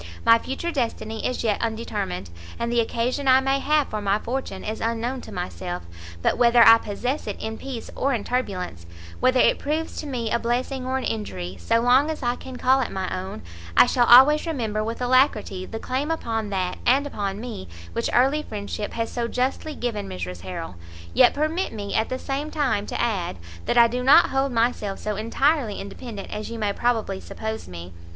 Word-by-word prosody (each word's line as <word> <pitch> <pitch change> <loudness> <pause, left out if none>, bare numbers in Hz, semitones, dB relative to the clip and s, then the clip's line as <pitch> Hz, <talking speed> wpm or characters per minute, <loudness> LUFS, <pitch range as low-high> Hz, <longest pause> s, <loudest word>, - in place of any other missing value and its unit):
My 230 0 +7
future 270 +8 -4
destiny 225 -5 -2
is 255 - -3
yet 215 -3 +1
undetermined, 95 - -3 0.3
and 235 0 -2
the 240 - +2
occasion 240 +4 -1
I 260 0 +7
may 270 +1 +1
have 300 0 +2
for 215 - -3
my 200 0 +2
fortune 230 -4 -4
is 215 +1 -4
unknown 230 +3 -2
to - - -11
myself; 180 -1 -5 0.4
but - - +1
whether 235 -1 +6
I 225 0 +9
possess 245 +8 -3
it 205 - -4
in 220 0 -5
peace 260 -4 -6
or 275 - +1
in 230 -6 -1
turbulence, 180 - -3 0.3
whether 255 0 +3
it - - +4
proves 310 +3 -2
to 305 - -7
me 240 -5 -3
a 235 - +2
blessing 255 +2 -2
or 260 +1 0
an 265 - -3
injury, 95 -5 -4
so 230 - +2
long 255 +5 +4
as 310 -3 -4
I 240 0 +1
can 260 0 -9
call 260 +2 +3
it 250 - -2
my 190 -1 -3
own, 185 - -6 0.3
I - - +9
shall 245 -1 +2
always 280 +7 +7
remember 225 -9 -1
with 230 +3 -4
alacrity 245 -7 +2
the 225 - -6
claim 260 +6 -2
upon 225 -9 -2
that 185 -2 -2
and 270 +4 +3
upon 200 -7 -3
me 230 - -7 0.3
which - - -1
early 270 +5 +3
friendship 210 -4 -5
has 230 0 -2
so 235 -1 -2
justly 265 +5 -2
given 215 -5 -3
Mrs 90 -1 -6
Harrel. 90 -1 -6 0.4
Yet - - +5
permit 310 +5 -1
me, 205 -2 -5
at 220 - +1
the 255 - -2
same 275 +3 -3
time, 270 -10 0
to - - -4
add, 195 - -1 0.3
that - - 0
I 235 - +9
do 245 +2 -3
not 265 +3 +6
hold 270 0 +1
myself 230 -4 0
so 210 -1 -3
entirely 230 +2 +1
independent 200 +1 -8
as 210 0 -5
you 230 - -5
may 210 -2 0
probably 225 -5 0
suppose 220 +2 -6
me. 90 0 -9
230 Hz, 200 wpm, -24 LUFS, 205-260 Hz, 0.4 s, I